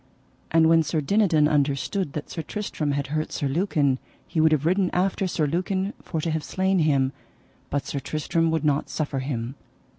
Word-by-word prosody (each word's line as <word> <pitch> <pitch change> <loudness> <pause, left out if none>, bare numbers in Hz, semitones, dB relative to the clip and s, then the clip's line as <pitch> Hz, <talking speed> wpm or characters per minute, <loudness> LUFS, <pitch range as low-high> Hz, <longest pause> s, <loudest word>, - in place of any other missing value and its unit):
And 160 0 +5
when 165 0 +6
Sir 160 0 -1
Dinadan 160 -2 +3
understood 145 +3 0
that 150 - -4
Sir 165 - -5
Tristram 155 -4 -3
had 140 0 -1
hurt 155 0 -1
Sir 140 - -1
Lucan 145 -4 +1 0.3
he 160 - 0
would 160 0 +5
have 150 -1 +2
ridden 185 +2 +2
after 190 +1 +1
Sir 165 -3 0
Lucan 185 +6 -1
for 160 - -4
to 165 - -1
have 155 -1 -1
slain 190 +2 +1
him, 140 -4 +2 0.6
but 145 0 -1
Sir 140 - -3
Tristram 160 +4 0
would 160 -1 0
not 145 -1 +1
suffer 145 -3 -2
him. 130 -2 -3
155 Hz, 185 wpm, -25 LUFS, 145-175 Hz, 0.6 s, when